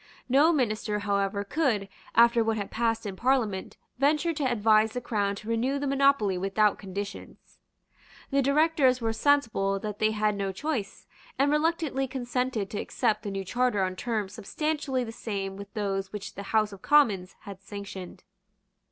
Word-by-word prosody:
No 280 +6 +5
minister, 215 -7 0
however, 200 -1 0
could, 220 -5 0 0.3
after 235 0 +6
what 225 0 0
had 200 -2 -4
passed 225 0 0
in 200 -2 -4
Parliament, 225 -5 0 0.2
venture 300 +4 +2
to 295 - -3
advise 215 -1 +3
the 250 - -2
Crown 205 -4 -1
to 210 - -10
renew 235 +5 0
the 285 - -3
monopoly 275 -9 +2
without 195 +2 +2
conditions. 200 +1 -8 0.7
The 275 0 +3
Directors 280 -2 +3
were 225 -2 -1
sensible 225 -6 +2
that 210 -1 -5
they 215 - +3
had 215 -1 0
no 195 -1 -2
choice, 200 - -4 0.3
and 280 +2 +3
reluctantly 300 -3 0
consented 250 -4 -2
to 205 - -3
accept 215 - 0
the 210 - -5
new 195 -1 -4
Charter 240 -1 +1
on 185 0 -2
terms 210 -2 -3
substantially 290 +1 -2
the 225 - -6
same 200 -4 -4
with 200 0 -9
those 195 -2 -2
which 210 -1 -6
the 200 0 -8
House 215 -2 +2
of 195 - -12
Commons 210 -11 +3
had 195 -1 -10
sanctioned. 195 -2 -8
220 Hz, 165 wpm, -27 LUFS, 200-265 Hz, 0.7 s, after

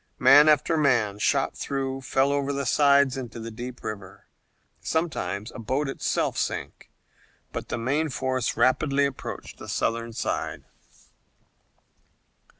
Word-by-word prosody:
Man 145 +4 +7
after 155 +2 +3
man, 120 -9 +2
shot - - +1
through, 135 -1 -3
fell 135 +1 +1
over 140 0 0
the 140 0 -2
sides 140 0 +4
into 120 -3 -6
the 115 0 -6
deep 125 +2 -8
river. 100 -2 -7 0.6
Sometimes 110 - -2
a - - -8
boat 130 +6 -1
itself 135 - -1
sank, - - -4 0.6
but - - -5
the - - -2
main 140 +7 0
force 130 -1 -1
rapidly 140 +3 +3
approached 140 -1 -6
the - - -9
Southern 115 0 -1
side. 115 - -3
130 Hz, 130 wpm, -26 LUFS, 115-140 Hz, 0.6 s, Man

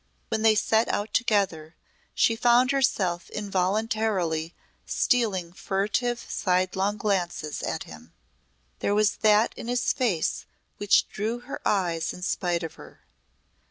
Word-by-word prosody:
When 220 -1 -1
they 220 -1 +5
set 220 +2 +2
out 205 +2 -2
together 190 -9 0 0.4
she 225 - +3
found 245 +3 +4
herself 190 -10 0
involuntarily 195 -4 -1 0.3
stealing 195 -9 0
furtive 210 +6 -1
sidelong 190 +2 0
glances 175 -7 -2
at - - -3
him. 80 +1 -13 0.7
There 205 - 0
was 210 0 +2
that 215 +1 +3
in - - -8
his 245 0 +1
face 220 - -1 0.3
which 205 -1 +3
drew 225 +4 -3
her 250 +3 -7
eyes 170 -5 0
in 180 - -9
spite 175 -2 -1
of 165 - -5
her. - - -15
205 Hz, 125 wpm, -26 LUFS, 180-225 Hz, 0.7 s, they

